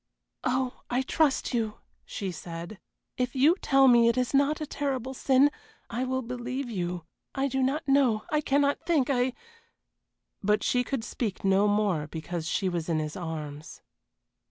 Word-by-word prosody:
"Oh, 255 Hz, 0 st, -1 dB
I 250 Hz, +2 st, +1 dB
trust 290 Hz, -1 st, +1 dB
you!" 220 Hz, -3 st, -1 dB, 0.3 s
she 195 Hz, -3 st, -4 dB
said. 170 Hz, +3 st, -8 dB, 0.4 s
"If 250 Hz, 0 st, -1 dB
you 290 Hz, +6 st, +5 dB
tell 270 Hz, -1 st, +5 dB
me 235 Hz, -2 st, +6 dB
it 235 Hz, -, +2 dB
is 250 Hz, +1 st, 0 dB
not 285 Hz, +2 st, +3 dB
a 305 Hz, -, -3 dB
terrible 265 Hz, -3 st, -3 dB
sin 270 Hz, +2 st, +4 dB, 0.4 s
I 250 Hz, +2 st, -1 dB
will 260 Hz, 0 st, -1 dB
believe 250 Hz, +2 st, -4 dB
you 175 Hz, -4 st, -3 dB, 0.3 s
I 270 Hz, 0 st, +1 dB
do 265 Hz, 0 st, -1 dB
not 290 Hz, +4 st, 0 dB
know 265 Hz, -6 st, +3 dB
I 300 Hz, -1 st, +2 dB
cannot 285 Hz, 0 st, +1 dB
think 300 Hz, -5 st, +2 dB
I 250 Hz, -1 st, +1 dB, 0.5 s
" -, -, -56 dB, 0.3 s
But 210 Hz, +1 st, +2 dB
she 250 Hz, 0 st, +2 dB
could 265 Hz, -3 st, -3 dB
speak 220 Hz, -4 st, -4 dB
no 195 Hz, +2 st, +4 dB
more 205 Hz, -7 st, +1 dB
because 160 Hz, +1 st, -5 dB
she 190 Hz, +2 st, 0 dB
was 175 Hz, -2 st, -2 dB
in 165 Hz, -, +1 dB
his 155 Hz, -1 st, -3 dB
arms. 155 Hz, -3 st, -6 dB
245 Hz, 170 wpm, -28 LUFS, 190-270 Hz, 0.5 s, me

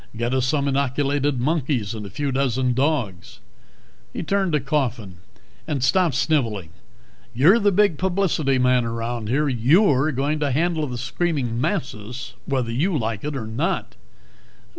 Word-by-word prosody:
Get 120 Hz, +2 st, -1 dB
us 130 Hz, -1 st, +1 dB
some 140 Hz, 0 st, +1 dB
inoculated 140 Hz, 0 st, 0 dB
monkeys 130 Hz, -6 st, 0 dB
and 105 Hz, -2 st, -6 dB
a -, -, -9 dB
few 140 Hz, +8 st, -2 dB
dozen 130 Hz, -1 st, +1 dB
dogs." 130 Hz, -, -2 dB, 0.7 s
He -, -, -5 dB
turned 195 Hz, +1 st, 0 dB
to 150 Hz, -, +3 dB
Coffin. 125 Hz, -, -2 dB, 0.5 s
"And 145 Hz, -5 st, -1 dB
stop 170 Hz, 0 st, +2 dB
sniveling. 115 Hz, -, 0 dB, 0.7 s
You're 165 Hz, -, +5 dB
the 205 Hz, -2 st, +3 dB
big 200 Hz, -5 st, +2 dB
publicity 175 Hz, -7 st, +1 dB
man 125 Hz, -1 st, +3 dB
around 115 Hz, -1 st, -3 dB
here; 145 Hz, +5 st, +1 dB
you're 140 Hz, -, +3 dB
going 145 Hz, +3 st, -1 dB
to 145 Hz, -1 st, 0 dB
handle 160 Hz, +2 st, 0 dB
the 125 Hz, -2 st, -5 dB
screaming 130 Hz, -6 st, -2 dB
masses, 125 Hz, -, -3 dB
whether 130 Hz, -4 st, -1 dB
you 155 Hz, +8 st, 0 dB
like 110 Hz, -4 st, -3 dB
it 150 Hz, -1 st, -3 dB
or 125 Hz, -5 st, -4 dB
not." 110 Hz, +1 st, -2 dB
135 Hz, 150 wpm, -22 LUFS, 120-155 Hz, 0.7 s, You're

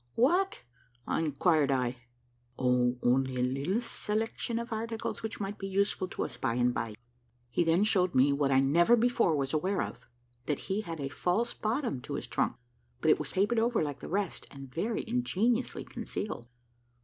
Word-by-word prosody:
"What?" 355 Hz, +11 st, +2 dB, 0.5 s
inquired 155 Hz, -1 st, +2 dB
I. 125 Hz, -1 st, 0 dB, 0.6 s
"Oh, 125 Hz, -1 st, +2 dB
only 130 Hz, +1 st, +2 dB
a 125 Hz, -, +1 dB
little 140 Hz, -, 0 dB
selection 225 Hz, 0 st, -2 dB
of 235 Hz, 0 st, -3 dB
articles, 225 Hz, +1 st, -3 dB
which 220 Hz, 0 st, -4 dB
might 200 Hz, 0 st, -4 dB
be 195 Hz, -, -4 dB
useful 195 Hz, -1 st, 0 dB
to -, -, -3 dB
us -, -, -7 dB
by 115 Hz, -, 0 dB
and 125 Hz, 0 st, +2 dB
by." 115 Hz, -3 st, -3 dB, 0.6 s
He 175 Hz, -, +2 dB
then 165 Hz, +4 st, +3 dB
showed 185 Hz, -4 st, +2 dB
me 135 Hz, +2 st, +5 dB
what 140 Hz, -1 st, +1 dB
I 135 Hz, 0 st, +5 dB
never 170 Hz, -, +5 dB
before 235 Hz, -7 st, +3 dB
was 135 Hz, -1 st, -1 dB
aware 185 Hz, +6 st, +1 dB
of; -, -, -6 dB, 0.5 s
that 150 Hz, -, +1 dB
he 195 Hz, +3 st, -2 dB
had 165 Hz, -6 st, -6 dB
a 140 Hz, -, -2 dB
false 195 Hz, +11 st, 0 dB
bottom 230 Hz, -, -1 dB
to -, -, -5 dB
his -, -, -4 dB
trunk; -, -, 0 dB, 0.4 s
but -, -, +4 dB
it -, -, +4 dB
was -, -, -5 dB
papered 205 Hz, +5 st, +2 dB
over 230 Hz, -4 st, +2 dB
like 145 Hz, -2 st, -4 dB
the -, -, -8 dB
rest, 195 Hz, 0 st, -2 dB
and 135 Hz, -2 st, -11 dB
very 215 Hz, +7 st, -2 dB
ingeniously 245 Hz, 0 st, 0 dB
concealed. 120 Hz, -, -5 dB
180 Hz, 180 wpm, -30 LUFS, 135-225 Hz, 0.6 s, me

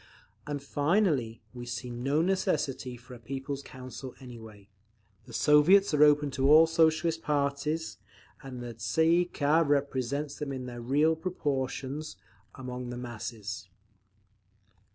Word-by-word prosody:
And 145 Hz, -2 st, -4 dB
finally, 145 Hz, -, +1 dB
we 120 Hz, -1 st, -8 dB
see 125 Hz, 0 st, -5 dB
no 135 Hz, +6 st, 0 dB
necessity 135 Hz, -9 st, -1 dB
for 125 Hz, +2 st, -14 dB
a 120 Hz, -, -10 dB
'People's 135 Hz, +3 st, -5 dB
Council' 130 Hz, 0 st, -9 dB
anyway; 110 Hz, -6 st, -12 dB, 0.6 s
the -, -, -11 dB
Soviets 155 Hz, -, +5 dB
are 150 Hz, -, +3 dB
open 150 Hz, -1 st, +4 dB
to 135 Hz, +1 st, +1 dB
all 160 Hz, +2 st, +9 dB
Socialist 160 Hz, 0 st, +2 dB
parties, 145 Hz, +2 st, -1 dB, 0.4 s
and 130 Hz, -3 st, -8 dB
the 120 Hz, -1 st, -6 dB
Tsay 160 Hz, +8 st, +1 dB
ee 175 Hz, +1 st, +4 dB
kah 155 Hz, -1 st, +2 dB
represents 140 Hz, -1 st, -1 dB
them 145 Hz, -2 st, -3 dB
in 130 Hz, -2 st, -5 dB
their 120 Hz, -1 st, -7 dB
real 145 Hz, +6 st, +2 dB
proportions 145 Hz, -3 st, -3 dB, 0.4 s
among 125 Hz, -1 st, -6 dB
the 120 Hz, -, -5 dB
masses…." 110 Hz, -5 st, -6 dB
140 Hz, 130 wpm, -29 LUFS, 125-155 Hz, 0.6 s, all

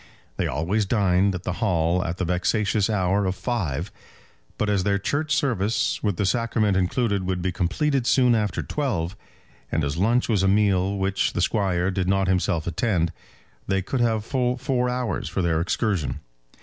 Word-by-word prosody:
They -, -, 0 dB
always 95 Hz, +7 st, -1 dB
dined 95 Hz, -2 st, +2 dB
at 90 Hz, -, -6 dB
the 90 Hz, -, -2 dB
Hall 90 Hz, -3 st, +1 dB
at 85 Hz, +2 st, -3 dB
the 95 Hz, -, -1 dB
vexatious 100 Hz, +4 st, +1 dB
hour 100 Hz, -1 st, +1 dB
of 95 Hz, -, -1 dB
five; 95 Hz, -, -2 dB, 0.7 s
but 105 Hz, -, 0 dB
as 100 Hz, -2 st, +2 dB
their 100 Hz, 0 st, +2 dB
church 145 Hz, +10 st, -1 dB
service, 115 Hz, -5 st, 0 dB
with 100 Hz, -5 st, -1 dB
the 100 Hz, -, 0 dB
sacrament 110 Hz, -2 st, +1 dB
included, 100 Hz, +2 st, 0 dB
would 95 Hz, -1 st, -1 dB
be 90 Hz, +1 st, -1 dB
completed 120 Hz, -, 0 dB
soon 125 Hz, -2 st, +4 dB
after 105 Hz, -3 st, 0 dB
twelve, 105 Hz, -, -2 dB, 0.6 s
and 80 Hz, -, 0 dB
as 70 Hz, +1 st, -2 dB
lunch 115 Hz, +7 st, +2 dB
was 105 Hz, -5 st, +2 dB
a 95 Hz, -, +2 dB
meal 100 Hz, -1 st, +2 dB
which 95 Hz, 0 st, 0 dB
the -, -, -2 dB
Squire 95 Hz, -2 st, +1 dB
did 95 Hz, -1 st, -1 dB
not 95 Hz, 0 st, +2 dB
himself 90 Hz, -3 st, +1 dB
attend, 85 Hz, -1 st, 0 dB, 0.5 s
they 95 Hz, -1 st, 0 dB
could 125 Hz, +6 st, -2 dB
have 110 Hz, -3 st, +1 dB
full 125 Hz, -1 st, 0 dB
four 125 Hz, -1 st, 0 dB
hours 125 Hz, -5 st, -2 dB
for 95 Hz, -, -2 dB
their 80 Hz, -2 st, +1 dB
excursion. 90 Hz, -, -1 dB
100 Hz, 175 wpm, -24 LUFS, 90-115 Hz, 0.7 s, soon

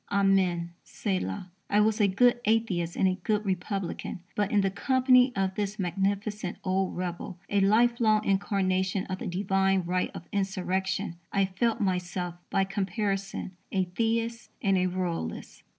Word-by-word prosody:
Amen: 190 Hz, -4 st, +2 dB
Selah), 185 Hz, -, -3 dB, 0.2 s
I 205 Hz, -, +3 dB
was 215 Hz, +1 st, +3 dB
a 205 Hz, -, +5 dB
good 240 Hz, +6 st, +4 dB
atheist 200 Hz, -7 st, +1 dB
and 190 Hz, -, +3 dB
a 185 Hz, 0 st, 0 dB
good 210 Hz, +2 st, 0 dB
republican; 190 Hz, -1 st, -3 dB
but 205 Hz, -1 st, +1 dB
in 205 Hz, -, +4 dB
the 195 Hz, -1 st, +1 dB
company 255 Hz, +4 st, +4 dB
of 190 Hz, -1 st, 0 dB
this 205 Hz, +1 st, -3 dB
magnificent 195 Hz, +1 st, -1 dB
old 190 Hz, 0 st, 0 dB
rebel, 180 Hz, 0 st, -4 dB
a 205 Hz, -, +3 dB
lifelong 215 Hz, +1 st, +3 dB
incarnation 190 Hz, -1 st, +1 dB
of 185 Hz, 0 st, -4 dB
the -, -, -4 dB
divine 195 Hz, +1 st, +1 dB
right 180 Hz, +1 st, 0 dB
of 175 Hz, -, -8 dB
insurrection, 190 Hz, -1 st, -1 dB
I 195 Hz, -1 st, +3 dB
felt 220 Hz, +5 st, 0 dB
myself, 180 Hz, -2 st, -1 dB, 0.2 s
by 195 Hz, -, +2 dB
comparison, 195 Hz, 0 st, -2 dB, 0.2 s
a 190 Hz, -1 st, +2 dB
Theist 230 Hz, +4 st, -1 dB
and 195 Hz, -1 st, +2 dB
a 185 Hz, 0 st, +2 dB
Royalist. 180 Hz, -, -4 dB
195 Hz, 150 wpm, -28 LUFS, 185-210 Hz, 0.2 s, a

